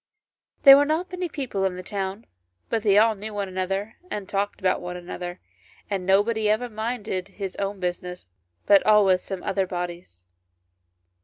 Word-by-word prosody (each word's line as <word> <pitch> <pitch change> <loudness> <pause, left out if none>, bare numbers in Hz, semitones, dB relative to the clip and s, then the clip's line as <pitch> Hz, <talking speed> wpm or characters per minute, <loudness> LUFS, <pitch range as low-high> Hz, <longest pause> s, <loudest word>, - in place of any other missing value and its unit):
There 275 -1 +11
were 285 - +4
not 320 +5 -1
many 365 -1 -3
people 255 -10 -3
in 190 -1 0
the 185 - -7
town, 195 +2 -4 0.4
but 225 - 0
they 205 -2 +4
all 220 +1 +5
knew 210 +1 -8
one 200 -1 -2
another 195 +3 -3
and 205 -2 -5
talked 200 +1 -2
about 185 -2 +1
one 180 0 -5
another, 175 0 -7 0.5
and 190 -2 -2
nobody 210 +3 +3
ever 230 +3 +1
minded 215 -4 -3
his 195 -1 -6
own 200 0 -3
business, 180 0 -4 0.4
but 200 -1 +6
always 200 -4 +5
some 190 -1 -6
other 195 -1 0
body's. 175 - -6
195 Hz, 165 wpm, -25 LUFS, 185-215 Hz, 0.5 s, There